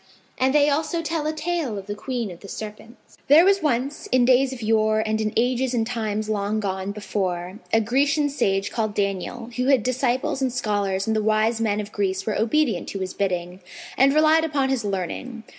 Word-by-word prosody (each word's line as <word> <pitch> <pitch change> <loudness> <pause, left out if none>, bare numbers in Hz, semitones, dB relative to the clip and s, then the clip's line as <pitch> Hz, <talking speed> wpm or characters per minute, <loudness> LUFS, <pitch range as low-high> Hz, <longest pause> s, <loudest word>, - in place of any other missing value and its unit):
'" - - -35
And 260 +1 +3
they 290 -1 +5
also 315 +3 0
tell 320 -1 -2
a - - +1
tale 310 -7 -2
of 195 - -7
THE 205 - -4
QUEEN 235 -1 -4
OF 175 - -11
THE 200 - -12
SERPENTS.[FN#507] 215 +4 -10
There 310 +5 +7
was 390 0 +4
once, 275 0 -1
in 255 -1 +4
days 260 +1 +4
of 250 -3 -7
yore 215 0 +2
and 220 0 0
in 215 -1 -1
ages 250 +2 +1
and 225 -2 +1
times 215 -2 -2
long 210 0 -1
gone 190 -1 -3
before, 190 -2 -3
a 225 - +4
Grecian 280 +6 +2
sage 195 -9 0
called 215 -2 -2
Daniel, 200 +4 -3
who 250 - 0
had 270 -5 +4
disciples 255 +1 0
and 260 -1 +1
scholars 205 -5 -1
and 220 - 0
the 215 - +1
wise 220 +2 +1
men 210 -2 +1
of 210 0 -5
Greece 195 -2 -1
were 215 - -1
obedient 230 - +1
to 195 - -5
his 185 -1 -4
bidding 180 -2 -2 0.4
and 270 +1 +5
relied 310 +2 +4
upon 285 -4 0
his 265 -4 0
learning. 205 +5 -4
225 Hz, 210 wpm, -23 LUFS, 205-265 Hz, 0.4 s, There